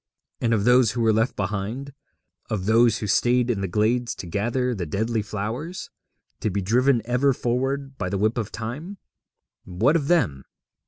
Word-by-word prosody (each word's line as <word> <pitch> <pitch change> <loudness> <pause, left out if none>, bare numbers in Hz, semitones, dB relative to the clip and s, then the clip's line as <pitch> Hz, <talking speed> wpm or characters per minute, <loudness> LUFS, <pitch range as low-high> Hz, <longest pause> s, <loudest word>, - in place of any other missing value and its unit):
And 115 - 0
of 110 -3 +2
those 125 -1 +4
who 120 - -2
were 110 -1 +4
left 110 +3 +1
behind, 105 +8 -3 0.6
of 100 -4 -2
those 115 +1 +4
who 110 - -4
stayed 120 +4 +2
in 100 -4 -2
the 95 - -1
glades 115 +6 0
to - - -7
gather 120 +8 -1
the 90 -7 -4
deadly 110 +7 -1
flowers, 115 - -5 0.5
to - - -1
be 100 +1 -1
driven 120 +5 +2
ever 125 +3 +2
forward 135 +3 -2
by 90 - -2
the 100 - -1
whip 110 +4 +1
of 110 -2 -4
Time 140 - -6 0.7
what 110 - +2
of 145 -4 0
them? 85 - +1
115 Hz, 175 wpm, -24 LUFS, 105-125 Hz, 0.7 s, those